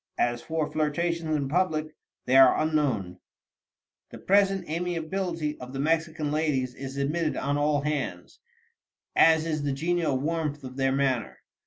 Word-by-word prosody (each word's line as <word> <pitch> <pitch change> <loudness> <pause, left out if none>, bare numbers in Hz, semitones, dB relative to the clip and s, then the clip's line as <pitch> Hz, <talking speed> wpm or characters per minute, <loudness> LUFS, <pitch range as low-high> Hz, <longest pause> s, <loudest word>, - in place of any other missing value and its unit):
As 120 0 0
for 160 -2 -2
flirtations 160 +1 -1
in 140 -2 -1
public, 155 -1 0 0.3
they 130 - +2
are 135 -1 +7
unknown." 130 - 0 0.9
The - - -10
present 195 -2 +2
amiability 165 -1 -3
of 125 +1 -9
the 135 - -4
Mexican 160 0 0
ladies 145 -5 0
is 135 +1 -7
admitted 155 +3 -1
on 140 +1 -1
all 145 0 +1
hands, 150 -1 -4 0.8
as 160 -1 +5
is 155 -2 -1
the 145 -1 -1
genial 165 -1 0
warmth 150 0 -2
of 130 0 -8
their 135 0 +1
manner. 130 -4 0
150 Hz, 145 wpm, -27 LUFS, 135-165 Hz, 0.9 s, are